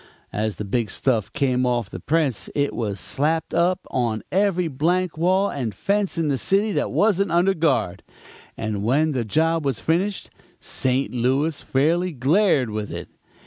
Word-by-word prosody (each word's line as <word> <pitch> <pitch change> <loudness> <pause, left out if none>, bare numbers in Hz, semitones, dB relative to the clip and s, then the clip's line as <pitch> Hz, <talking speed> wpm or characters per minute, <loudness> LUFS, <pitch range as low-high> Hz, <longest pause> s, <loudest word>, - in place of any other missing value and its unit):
As 110 0 -1
the 105 - -5
big 110 +2 -1
stuff 110 -6 0
came 130 -3 +1
off 120 -4 0
the - - -6
press 150 -8 0
it 145 0 0
was 105 -4 -3
slapped 160 - -1
up 180 +2 +2
on 115 -4 -1
every 190 -2 +2
blank 170 +5 0
wall 185 +5 +2
and 120 -8 -4
fence 200 - -1
in 165 -2 0
the 140 -3 0
city 205 +3 +1
that - - 0
wasn't 200 -3 +2
under 175 +3 +3
guard; 130 - 0 0.6
and 110 -2 -3
when 145 +9 +2
the 130 -4 -1
job 160 +8 +1
was 135 -6 -1
finished, 185 +5 -1 0.3
St. 130 +1 -1
Louis 135 +6 0
fairly 170 +6 +1
glared 140 - +2
with 105 -1 -4
it. - - -6
145 Hz, 165 wpm, -23 LUFS, 120-175 Hz, 0.6 s, under